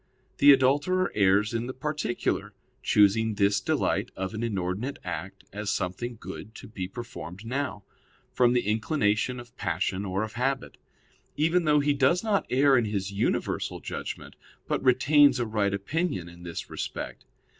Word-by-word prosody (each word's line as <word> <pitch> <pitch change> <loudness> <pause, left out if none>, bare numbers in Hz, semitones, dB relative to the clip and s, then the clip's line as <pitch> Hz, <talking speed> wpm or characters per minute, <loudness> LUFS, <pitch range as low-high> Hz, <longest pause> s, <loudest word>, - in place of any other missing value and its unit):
The 145 - +9
adulterer 145 +8 +3
errs 100 +2 +3
in 115 +1 -2
the 130 - -6
particular, 150 -3 -2 0.3
choosing 105 +2 +3
this 100 -1 +2
delight - - 0
of 95 +2 -4
an 110 - -4
inordinate 105 +3 -2
act - - -6
as 105 0 -3
something 115 +7 -2
good 95 +4 -9
to - - -10
be 95 -4 -5
performed 105 -4 -8
now, 130 -4 -3 0.5
from 125 -1 +4
the 120 -3 +1
inclination 110 +2 +1
of 120 0 -12
passion 95 +2 -1
or 95 +1 -1
of 110 - -6
habit; 130 +2 -2 0.6
even 165 +3 +2
though 150 -1 +4
he 145 0 +2
does 140 +7 +2
not 210 -3 +1
err 135 +1 +4
in 115 - 0
his 100 -2 -2
universal 100 +1 -1
judgment, - - -6 0.3
but - - -1
retains 140 +1 +5
a 120 - 0
right 105 -2 0
opinion 100 - -2
in 85 0 -13
this 85 -1 -6
respect. - - -6
115 Hz, 155 wpm, -27 LUFS, 100-140 Hz, 0.6 s, The